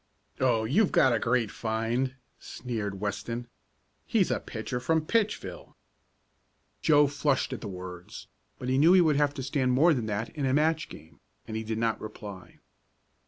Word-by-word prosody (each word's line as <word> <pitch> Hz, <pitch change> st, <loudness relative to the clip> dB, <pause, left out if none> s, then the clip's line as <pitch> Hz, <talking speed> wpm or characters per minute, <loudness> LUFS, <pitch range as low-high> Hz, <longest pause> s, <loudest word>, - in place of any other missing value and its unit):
"Oh, 120 Hz, -4 st, +2 dB
you've 165 Hz, -, +2 dB
got 130 Hz, -4 st, +4 dB
a 115 Hz, -, +1 dB
great 115 Hz, -2 st, +1 dB
find!" 115 Hz, +4 st, -1 dB, 0.2 s
sneered 105 Hz, -6 st, -5 dB
Weston. 115 Hz, +4 st, -4 dB, 0.6 s
"He's -, -, +2 dB
a -, -, +1 dB
pitcher 125 Hz, -, -5 dB
from 160 Hz, +4 st, +1 dB
Pitchville!" 215 Hz, +2 st, -2 dB, 1.1 s
Joe 150 Hz, -2 st, +5 dB
flushed 145 Hz, -1 st, 0 dB
at -, -, -6 dB
the 110 Hz, -, -5 dB
words, 90 Hz, -2 st, -8 dB, 0.3 s
but 125 Hz, -, -6 dB
he 130 Hz, +1 st, +2 dB
knew 165 Hz, +5 st, +6 dB
he 185 Hz, -, +7 dB
would 155 Hz, -4 st, +3 dB
have 145 Hz, -1 st, +2 dB
to 135 Hz, -, -4 dB
stand 130 Hz, -1 st, +1 dB
more 160 Hz, +6 st, +5 dB
than 120 Hz, -6 st, -2 dB
that 110 Hz, +2 st, -2 dB
in 145 Hz, -4 st, -2 dB
a 130 Hz, -, +2 dB
match 155 Hz, +1 st, +1 dB
game, 75 Hz, -2 st, -13 dB, 0.3 s
and 110 Hz, -, -5 dB
he 110 Hz, -, -2 dB
did 110 Hz, 0 st, -3 dB
not 115 Hz, -1 st, 0 dB
reply. 105 Hz, -3 st, -9 dB
125 Hz, 170 wpm, -28 LUFS, 110-145 Hz, 1.1 s, he